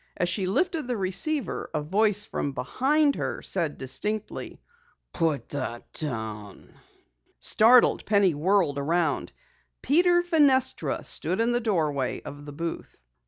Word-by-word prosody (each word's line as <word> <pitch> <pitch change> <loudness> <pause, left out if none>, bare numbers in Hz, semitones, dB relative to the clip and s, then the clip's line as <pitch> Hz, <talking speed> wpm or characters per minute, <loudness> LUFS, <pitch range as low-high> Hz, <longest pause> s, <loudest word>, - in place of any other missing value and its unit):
As 175 - 0
she 185 +1 -1
lifted 325 - 0
the 245 -2 -2
receiver, 210 +10 -1
a 150 - 0
voice 205 +5 +1
from 140 - -3
behind 275 - +1
her - - -4
said 165 -6 -2
distinctly: 210 +11 -3 0.5
"Put 160 -4 -1
that 130 -4 -5
down!" 110 -8 -6 0.7
Startled, 235 - +5
Penny 200 -4 +3
whirled 160 -2 +1
around. 165 +4 -1 0.5
Peter 350 +4 +3
Fenestra 285 -7 +2
stood 180 +5 0
in 230 +1 +2
the 240 0 0
doorway 155 - -1
of 145 +1 -10
the - - -7
booth. 165 - -6
185 Hz, 125 wpm, -26 LUFS, -, 0.7 s, Startled